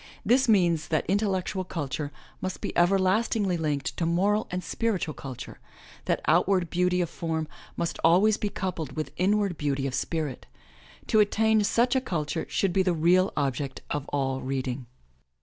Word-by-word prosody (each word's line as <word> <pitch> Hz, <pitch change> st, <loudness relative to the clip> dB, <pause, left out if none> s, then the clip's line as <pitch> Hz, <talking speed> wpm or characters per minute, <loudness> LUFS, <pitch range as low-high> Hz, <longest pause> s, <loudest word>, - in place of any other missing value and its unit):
This 255 Hz, +1 st, +4 dB
means 175 Hz, -7 st, +3 dB
that 155 Hz, -, 0 dB
intellectual 195 Hz, -1 st, 0 dB
culture 145 Hz, -4 st, -4 dB, 0.3 s
must 185 Hz, 0 st, -3 dB
be -, -, -5 dB
everlastingly 195 Hz, +2 st, +2 dB
linked 150 Hz, -5 st, -2 dB
to 170 Hz, -, 0 dB
moral 200 Hz, +6 st, +2 dB
and 180 Hz, 0 st, -3 dB
spiritual 195 Hz, -6 st, -1 dB
culture, 130 Hz, -4 st, -8 dB, 0.5 s
that -, -, 0 dB
outward 185 Hz, -3 st, +2 dB
beauty 180 Hz, 0 st, +2 dB
of 170 Hz, -, -1 dB
form 160 Hz, -2 st, -2 dB, 0.3 s
must 170 Hz, -, -2 dB
always 185 Hz, +6 st, +5 dB
be 210 Hz, -, -2 dB
coupled 165 Hz, -8 st, -4 dB
with 155 Hz, +2 st, -4 dB
inward 195 Hz, -1 st, +1 dB
beauty 140 Hz, -2 st, -1 dB
of 135 Hz, -, -2 dB
spirit. 155 Hz, -2 st, -3 dB, 0.6 s
To 215 Hz, -, +3 dB
attain 220 Hz, +1 st, +3 dB
such 240 Hz, +5 st, +2 dB
a 260 Hz, -, +3 dB
culture 155 Hz, -, -3 dB
should 195 Hz, -3 st, 0 dB
be 195 Hz, -, +3 dB
the 185 Hz, -1 st, +2 dB
real 180 Hz, +4 st, +3 dB
object 135 Hz, -1 st, -2 dB
of 145 Hz, -1 st, -3 dB
all 135 Hz, -2 st, -1 dB
reading. 130 Hz, -1 st, -3 dB
175 Hz, 160 wpm, -27 LUFS, 150-200 Hz, 0.6 s, always